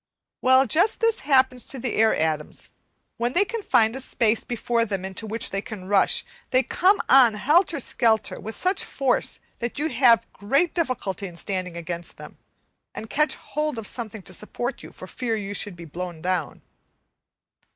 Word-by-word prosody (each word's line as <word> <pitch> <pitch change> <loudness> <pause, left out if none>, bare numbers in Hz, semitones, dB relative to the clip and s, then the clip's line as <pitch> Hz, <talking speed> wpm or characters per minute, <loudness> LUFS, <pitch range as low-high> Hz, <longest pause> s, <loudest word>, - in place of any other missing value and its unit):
Well, 260 +1 +5
just 355 +10 +2
this 455 -1 +2
happens 260 -3 +2
to 270 - -3
the 245 -1 -3
air 220 0 +3
atoms; 155 -1 -3 0.5
when 240 +2 -1
they 365 - +4
find 255 - +1
a - - -4
space 230 -4 +1
before 235 0 -1
them 195 -4 -3
into 190 +3 -5
which 225 +1 -2
they 195 - -2
can 215 -5 -9
rush, 200 -1 +3 0.2
they 255 +1 +3
come 385 +8 +3
on 250 -5 +6
helter 310 - +2
skelter, 225 -3 +1
with 220 +1 -7
such 370 +1 +1
force 270 -3 0 0.2
that 235 -1 -4
you 305 +3 -1
have 240 -3 +4
great 275 +12 +1
difficulty 250 - -2
in 175 - -11
standing 185 -1 -4
against 170 0 -5
them, - - -12 0.6
and 220 - -7
catch 300 +1 +2
hold 300 -3 -3
of 225 - -5
something 220 -3 -4
to 185 - -6
support 240 +6 -4
you - - -11
for - - -11
fear 235 -3 -3
you 205 -2 -4
should 205 -2 -3
be 170 0 -10
blown 175 +1 -6
down. 180 -3 -3
230 Hz, 175 wpm, -24 LUFS, 195-270 Hz, 0.6 s, on